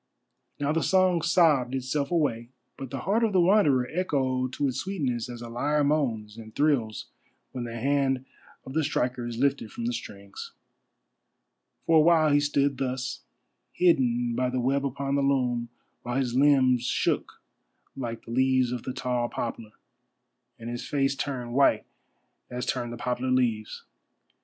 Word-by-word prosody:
Now 145 0 0
the 165 +1 +1
song 185 -2 +3
sobbed 150 -7 +3
itself 135 +2 -2
away, 135 -9 0 0.3
but 135 -2 -7
the 135 +1 -5
heart 215 +5 +1
of 220 -3 +1
the 185 - +4
Wanderer 170 -9 +4
echoed 130 -7 0
to 145 - 0
its 130 - -2
sweetness 135 - -2
as 120 -1 -7
a - - -7
lyre 145 +6 0
moans 115 -8 -1
and 110 -1 -11
thrills 130 -8 +1 0.5
when 125 -2 -5
the 115 0 -6
hand 135 +1 0 0.4
of 130 - -8
the 160 +1 +1
striker 125 -4 -1
is 120 -1 -5
lifted 135 -3 0
from 115 - -5
the 120 - -1
strings. 100 -4 -8 1.3
For 165 - +4
a - - +7
while 160 -1 +4
he 145 - +5
stood 140 -1 +1
thus, 130 -1 -3 0.5
hidden 125 -9 +2
by 125 +1 0
the 130 0 -2
web 135 +3 +1
upon 140 +1 -3
the 140 - +2
loom, 125 -4 0 0.3
while 120 0 -4
his 130 -3 0
limbs 130 -2 +4
shook - - 0 0.6
like 115 -4 -5
the 115 - -9
leaves 130 0 +2
of 125 -2 -3
the 130 - -5
tall 125 -2 -1
poplar, 115 -2 -5 0.8
and 115 - -9
his 120 0 -4
face 140 -1 +1
turned 130 -4 -4
white 140 +2 +3 0.6
as 125 +1 -4
turn 120 -2 -2
the 120 - -7
poplar 125 +1 -2
leaves. 120 -4 0
130 Hz, 165 wpm, -27 LUFS, 120-145 Hz, 1.3 s, a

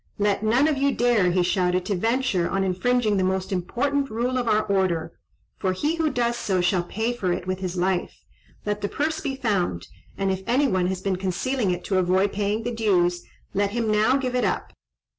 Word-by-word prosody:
"Let 205 -1 +1
none 240 +7 +3
of 300 -3 0
you 280 0 +3
dare," 235 -6 +3
he 180 0 +2
shouted, 180 0 +1
"to 210 - -1
venture 225 -2 0
on 195 0 0
infringing 210 +3 +1
the 190 - +2
most 190 +1 -1
important 275 +10 -1
rule 245 +3 -1
of 245 - -2
our 215 -1 +3
order, 175 -4 0 0.5
for 185 -1 0
he 295 - 0
who 320 -1 +1
does 240 -3 0
so 190 -5 0
shall 180 +1 +2
pay 220 +7 -2
for 190 -7 -1
it 175 - -2
with 185 0 -2
his 185 -1 -4
life. 185 0 -1 0.4
Let 210 0 -2
the 205 - -2
purse 315 +2 -1
be 270 -2 -2
found, 185 - -1 0.3
and 195 -1 0
if 190 0 -2
any 265 +4 +3
one 185 -6 +1
has 185 0 -3
been 190 -1 -1
concealing 195 +5 -1
it 180 0 -2
to 190 -2 +1
avoid 185 +2 +2
paying 210 +2 -1
the 240 +1 -3
dues, 180 -6 +2 0.3
let 200 0 +1
him 230 -2 0
now 215 +5 +3
give 255 -2 -2
it 250 - +1
up. - - -1
205 Hz, 215 wpm, -24 LUFS, 185-245 Hz, 0.5 s, none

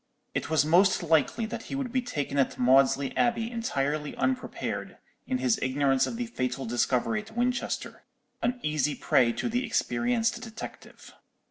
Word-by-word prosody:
It - - -2
was 160 -2 +3
most 180 +4 +4
likely 165 +8 +2
that 225 +1 -6
he - - -5
would 270 -3 -3
be 255 0 +1
taken 145 - -2
at 135 - +1
Maudesley 135 +2 +4
Abbey 235 -1 +1
entirely 150 - -2
unprepared, 260 -1 -2 0.3
in 260 - 0
his 250 -4 +1
ignorance 135 0 +2
of - - -4
the 245 +1 -2
fatal 130 - -3
discovery 125 - 0
at 220 +2 -14
Winchester; 250 +2 -1 0.4
an 245 +1 0
easy 150 -1 0
prey 120 -2 +3
to - - -2
the 245 +2 0
experienced 235 -2 0
detective. 225 -2 -10
215 Hz, 155 wpm, -28 LUFS, -, 0.4 s, most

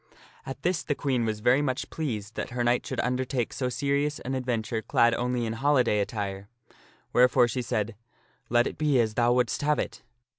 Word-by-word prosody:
At 135 +1 -7
this 175 -1 +1
the 145 - -2
Queen 130 -5 0
was 110 -1 -2
very 125 +5 +4
much 130 -3 -2
pleased, 110 -9 -4
that - - -4
her 120 0 -2
knight 120 +1 +2
should - - -3
under 125 +1 0
take 125 -3 -2
so 130 -1 -1
serious 140 +3 0
an 130 - -4
adventure 120 -3 -2
clad 120 +1 +3
only 125 0 -1
in 110 - -2
holiday 125 -4 +2
attire; 100 -1 -3 0.6
wherefore 125 0 +5
she 125 +2 -2
said, 115 -2 -2 0.3
" - - -36
Let 120 +1 +4
it - - -5
be 150 -4 +3
as 110 -2 +1
thou 120 +1 +3
wouldst 125 -1 +1
have 150 +1 +2
it." - - -4
125 Hz, 200 wpm, -27 LUFS, 115-135 Hz, 0.6 s, wherefore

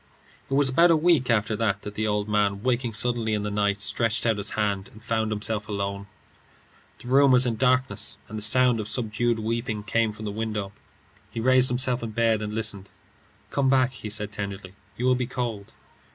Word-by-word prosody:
It 135 - -1
was 140 0 +4
about 170 +7 +4
a 165 - +5
week 155 -6 +2
after 110 -1 +1
that 105 -3 -1
the 105 +1 -3
old 105 0 -1
man, 105 -1 0
waking 125 -2 0
suddenly 115 -1 +1
in 105 - -2
the 105 - -3
night, 100 0 0
stretched 115 +1 0
out 115 -2 +2
his 100 - 0
hand 100 -2 -1
and 110 - -16
found 110 -2 -1
himself 105 0 -2
alone. 100 -1 -4 0.9
The - - -12
room 135 +2 +5
was 130 0 +5
in 120 -2 -1
darkness, 130 +2 0
and 110 - -9
the 105 - -4
sound 125 +1 +4
of 105 - -4
subdued 120 0 +1
weeping 110 -1 -3
came 115 0 0
from 105 +1 -9
the 105 - -3
window. 105 -2 -4 0.6
He - - -6
raised 130 +2 +5
himself 125 0 +1
in 115 - -4
bed 115 -1 +1
and 105 0 -4
listened. 105 -3 -2 0.6
"Come 135 -2 +1
back," 130 -1 +3
he 110 -4 -8
said, 105 0 -2
tenderly. 100 -2 -6 0.2
"You 125 - -2
will 130 - +4
be 125 -1 -1
cold." 120 -6 -5
110 Hz, 200 wpm, -25 LUFS, 105-125 Hz, 0.9 s, a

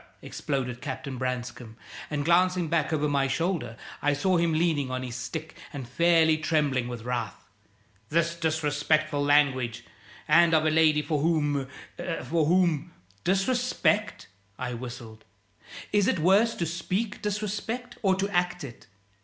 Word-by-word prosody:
exploded 125 -4 -3
Captain 135 -2 -5
Branscome, 125 -3 -4 0.3
and 145 -1 -2
glancing 180 0 +3
back 160 -2 +1
over 150 -1 +1
my 140 -2 +1
shoulder 135 -6 -2 0.2
I 145 - +2
saw 180 +6 +1
him 170 0 +2
leaning 155 -4 +1
on 130 0 -3
his 125 -2 -6
stick 155 +6 -6 0.2
and 135 -5 -7
fairly 160 +3 +3
trembling 150 -6 +1
with 120 -2 -6
wrath. 120 -1 -4 0.6
"This 165 +1 +1
disrespectful 155 -2 0
language! 135 -5 +2 0.4
And 165 +1 +5
of 155 0 +3
a 155 - +3
lady 155 -1 +4
for 150 0 -1
whom 145 -4 +1 0.6
for 160 -2 +1
whom 170 -3 +2
" 100 +2 -33
"Disrespect?" 215 +1 +1 0.3
I 125 -1 -4
whistled. 115 -2 -8 0.7
"Is 205 -2 +3
it - - +2
worse 195 +8 +3
to 170 - -2
speak 185 +6 -3
disrespect 210 +4 -4
or 190 -3 +3
to 195 +1 -1
act 175 -1 0
it? 125 -4 -10
155 Hz, 145 wpm, -27 LUFS, 130-175 Hz, 0.7 s, And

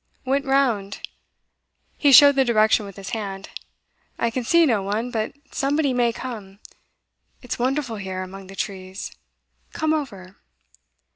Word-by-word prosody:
'Went 275 +2 0
round.' 240 -8 0 0.9
He 285 - +3
showed 285 +1 +9
the 270 - +4
direction 215 -3 +3
with 195 - -11
his 195 -1 -8
hand. 195 -3 -5 0.7
'I 235 - 0
can 250 +2 -2
see 335 +7 +5
no 225 -8 +2
one, 215 +5 -2
but 220 -2 -2 0.2
somebody 280 0 +1
may 240 -1 +2
come. 215 -6 -8 0.9
It's 250 - -5
wonderful 255 -2 -1
here, 190 -1 -4
among 190 +1 -10
the 195 - -11
trees. 190 0 -5 0.6
Come 315 0 0
over. 200 -11 -5
230 Hz, 140 wpm, -23 LUFS, 195-270 Hz, 0.9 s, showed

